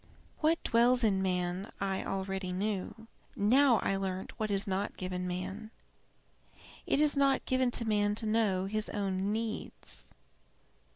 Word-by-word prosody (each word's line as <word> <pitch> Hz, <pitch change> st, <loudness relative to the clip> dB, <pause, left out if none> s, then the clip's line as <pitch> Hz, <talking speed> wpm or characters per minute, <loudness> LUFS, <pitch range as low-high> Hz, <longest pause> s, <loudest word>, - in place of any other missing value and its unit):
"What 325 Hz, +1 st, +2 dB
dwells 245 Hz, +2 st, +4 dB
in 195 Hz, -3 st, +3 dB
man 180 Hz, +1 st, -1 dB
I 195 Hz, -1 st, -1 dB
already 190 Hz, -1 st, -3 dB
knew. 205 Hz, +3 st, -3 dB, 0.3 s
Now 245 Hz, +4 st, +5 dB
I 195 Hz, -, +1 dB
learnt 190 Hz, -1 st, -3 dB
what 215 Hz, -1 st, -1 dB
is 200 Hz, -1 st, +1 dB
not 195 Hz, +1 st, -2 dB
given 180 Hz, 0 st, -3 dB
him. 190 Hz, +4 st, -5 dB, 1.2 s
It -, -, +2 dB
is 300 Hz, -1 st, +4 dB
not 275 Hz, -1 st, +2 dB
given 255 Hz, -1 st, +2 dB
to 235 Hz, -1 st, +1 dB
man 205 Hz, -1 st, +1 dB
to 220 Hz, -, -2 dB
know 215 Hz, -4 st, +1 dB
his 215 Hz, +2 st, -2 dB
own 195 Hz, -1 st, -1 dB
needs. 220 Hz, 0 st, -3 dB
205 Hz, 140 wpm, -31 LUFS, 190-230 Hz, 1.2 s, Now